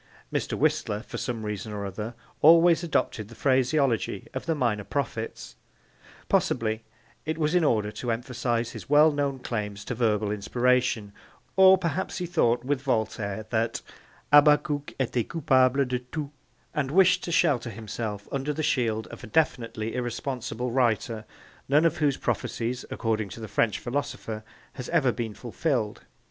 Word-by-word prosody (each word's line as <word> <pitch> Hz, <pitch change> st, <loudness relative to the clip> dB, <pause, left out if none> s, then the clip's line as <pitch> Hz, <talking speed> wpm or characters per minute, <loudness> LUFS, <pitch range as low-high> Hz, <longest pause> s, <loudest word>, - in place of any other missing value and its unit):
Mr. -, -, -1 dB
Whistler, 145 Hz, -8 st, 0 dB
for -, -, -7 dB
some 115 Hz, -4 st, -3 dB
reason 105 Hz, +1 st, -4 dB
or 100 Hz, -1 st, -4 dB
other, 105 Hz, +4 st, -5 dB, 0.3 s
always 165 Hz, +2 st, +6 dB
adopted 115 Hz, -9 st, -1 dB
the 115 Hz, -, -13 dB
phraseology 130 Hz, -5 st, +1 dB
of 130 Hz, +4 st, -5 dB
the 165 Hz, -, +1 dB
minor 115 Hz, -7 st, 0 dB
prophets. 115 Hz, -3 st, -4 dB, 0.7 s
Possibly 110 Hz, 0 st, +1 dB, 0.4 s
it 160 Hz, +1 st, -2 dB
was 155 Hz, 0 st, 0 dB
in 180 Hz, -2 st, +4 dB
order 105 Hz, -7 st, +2 dB
to 120 Hz, -, -5 dB
emphasise 120 Hz, 0 st, -1 dB
his 110 Hz, -3 st, -9 dB
well 150 Hz, +2 st, +6 dB
known 140 Hz, -2 st, -1 dB
claims 105 Hz, -5 st, -4 dB
to -, -, -3 dB
verbal 110 Hz, -3 st, +1 dB
inspiration, 120 Hz, 0 st, +1 dB, 0.4 s
or 190 Hz, 0 st, +8 dB
perhaps 175 Hz, 0 st, -2 dB
he 180 Hz, -, -2 dB
thought 125 Hz, -9 st, +1 dB
with 140 Hz, -1 st, 0 dB
Voltaire 110 Hz, -5 st, -1 dB
that 115 Hz, 0 st, 0 dB, 0.5 s
Habakkuk 145 Hz, 0 st, +4 dB
etait 125 Hz, -2 st, -1 dB
capable 135 Hz, -4 st, +3 dB
de 125 Hz, -1 st, -1 dB
tout, 140 Hz, +3 st, -6 dB, 0.4 s
and 140 Hz, -3 st, -1 dB
wished 185 Hz, +4 st, +4 dB
to 170 Hz, -, -4 dB
shelter 145 Hz, -9 st, +2 dB
himself 105 Hz, -1 st, -5 dB
under 140 Hz, +2 st, -1 dB
the 155 Hz, -, -3 dB
shield 115 Hz, -6 st, +1 dB
of -, -, -10 dB
a -, -, -7 dB
definitely 115 Hz, -4 st, 0 dB
irresponsible 125 Hz, -1 st, -3 dB
writer 115 Hz, -3 st, 0 dB, 0.4 s
none 150 Hz, +4 st, +4 dB
of 165 Hz, -1 st, +2 dB
whose 145 Hz, -3 st, +1 dB
prophecies, 120 Hz, +1 st, -2 dB
according 110 Hz, -3 st, -1 dB
to 105 Hz, -, -9 dB
the 110 Hz, -, -6 dB
French 105 Hz, +1 st, +1 dB
philosopher, 120 Hz, -4 st, -4 dB, 0.3 s
has 125 Hz, -, -7 dB
ever 150 Hz, -7 st, +3 dB
been 115 Hz, -3 st, -4 dB
fulfilled. 120 Hz, -, -2 dB
125 Hz, 155 wpm, -27 LUFS, 110-145 Hz, 0.7 s, or